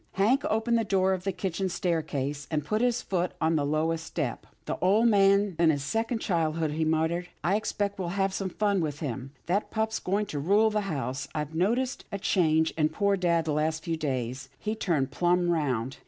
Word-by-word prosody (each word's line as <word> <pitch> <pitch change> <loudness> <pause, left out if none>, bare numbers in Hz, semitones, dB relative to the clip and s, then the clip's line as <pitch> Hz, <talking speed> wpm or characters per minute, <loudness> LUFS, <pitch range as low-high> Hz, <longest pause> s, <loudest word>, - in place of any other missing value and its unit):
Hank 225 +8 +2
opened 225 +2 +2
the - - +1
door 190 -2 +2
of 185 0 -4
the 195 - +1
kitchen 190 0 -2
staircase, 150 -5 -2
and 150 -2 -1
put 215 +8 0
his 245 -1 +1
foot 180 -2 -1
on 160 0 +2
the 150 - +1
lowest 160 +3 0
step. 155 -7 -4
" - - -40
The - - -3
old 210 +6 +4
man's 200 -2 +4
in 170 -1 +5
his 145 -3 +1
second 225 - -1
childhood," 160 -4 0
he 160 +2 -1
muttered. 160 +3 0
" - - -43
I 190 - +2
expect 205 -2 -2
we'll 180 - -2
have 195 +2 0
some 195 -1 -2
fun 200 0 +1
with 150 -2 -3
him. 130 -2 -4
That 190 +5 0
pup's 220 0 -1
going 200 +3 0
to 145 - -2
rule 205 +8 +3
the 210 0 0
house. 140 -2 -3
I've 150 0 -3
noticed 235 +10 0
a 200 - -2
change 160 -5 +2
in 155 -1 +1
poor 200 +5 +1
dad 170 -3 +1
the 155 - 0
last 155 +1 0
few 165 - -1
days. 130 -4 -3
He's 215 +1 -3
turned 150 -8 0
plumb 175 0 +2
round. 135 -6 -1
175 Hz, 215 wpm, -28 LUFS, 155-200 Hz, -, in